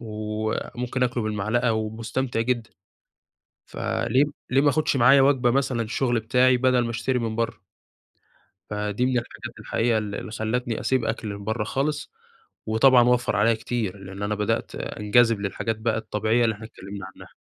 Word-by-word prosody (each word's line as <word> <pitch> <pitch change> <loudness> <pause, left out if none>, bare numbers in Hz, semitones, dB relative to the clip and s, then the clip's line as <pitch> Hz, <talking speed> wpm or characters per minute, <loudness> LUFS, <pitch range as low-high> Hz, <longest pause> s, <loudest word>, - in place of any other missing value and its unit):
وممكن 110 +3 -3
آكله 125 -2 0
بالمعلقة 110 +3 0
ومستمتع 115 +3 -2
جدًا، 120 -1 -1 1.0
فليه 130 +5 0 0.2
ليه 135 +2 +3
ما 145 - +4
آخدش 150 +1 +1
معايا 135 +3 +6
وجبة 135 -3 +3
مثلًا 130 -2 0
الشغل 120 +2 0
بتاعي، 125 +3 +3
بدل 130 0 +3
ما 115 - -3
أشتري 125 +2 -1
من 115 -2 -2
برّه؟ 115 -7 -2 1.1
فدي 105 +3 -1
من 130 - 0
الحاجات 120 - -7
الحقيقية 115 -1 0
اللي 105 -1 -4
اللي - - -7
خلّتني 115 +2 -2
أسيب 130 -3 +1
أكل 115 -1 -3
من 100 0 -6
برّه 110 +1 -1
خالص، 145 +6 -2 0.5
وطبعًا 120 +3 +5
وفّر 125 -3 +2
عليّا 110 +3 +4
كتير، 110 -3 -3
لإن 95 +1 -8
أنا 105 +1 -1
بدأت 105 0 -1
أنجذب 115 +1 +2
للحاجات 105 +2 -2
بقى 110 0 0
الطبيعية 110 +2 0
اللي 110 -2 +1
إحنا 110 +2 -10
اتكلّمنا 100 -2 -9
عنّها. - - -14
115 Hz, 160 wpm, -24 LUFS, 110-125 Hz, 1.1 s, معايا